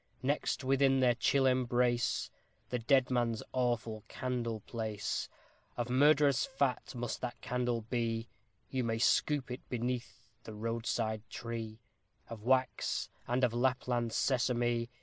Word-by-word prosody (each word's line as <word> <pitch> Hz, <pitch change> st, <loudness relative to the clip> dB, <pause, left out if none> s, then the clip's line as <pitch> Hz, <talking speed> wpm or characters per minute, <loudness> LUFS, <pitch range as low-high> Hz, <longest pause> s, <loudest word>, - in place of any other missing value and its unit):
Next 140 Hz, +1 st, 0 dB
within 135 Hz, 0 st, +3 dB
their 125 Hz, -2 st, +5 dB
chill 135 Hz, +3 st, +2 dB
embrace 125 Hz, -2 st, +2 dB, 0.4 s
The 125 Hz, -, 0 dB
dead 130 Hz, +2 st, +3 dB
man's 120 Hz, -3 st, +1 dB
Awful 120 Hz, -4 st, -1 dB
Candle 120 Hz, -3 st, -3 dB
place; 110 Hz, -2 st, -3 dB, 0.5 s
Of 120 Hz, 0 st, -2 dB
murderer's 140 Hz, 0 st, +5 dB
fat 135 Hz, -2 st, -1 dB
must 120 Hz, -1 st, -3 dB
that 120 Hz, -2 st, -4 dB
candle 125 Hz, -2 st, -1 dB
be 115 Hz, 0 st, -2 dB, 0.4 s
You 130 Hz, -1 st, 0 dB
may 115 Hz, -1 st, 0 dB
scoop 130 Hz, +3 st, +2 dB
it 125 Hz, -, -5 dB
beneath 125 Hz, 0 st, -3 dB, 0.2 s
the 110 Hz, -, -8 dB
roadside 115 Hz, 0 st, -1 dB
tree, 115 Hz, -1 st, -6 dB, 0.5 s
Of 115 Hz, -2 st, -7 dB
wax, 130 Hz, +3 st, +1 dB, 0.2 s
and 125 Hz, +2 st, 0 dB
of 120 Hz, -2 st, +3 dB
Lapland 125 Hz, -1 st, +1 dB
sisame. 120 Hz, -2 st, +1 dB
120 Hz, 130 wpm, -33 LUFS, 115-130 Hz, 0.5 s, their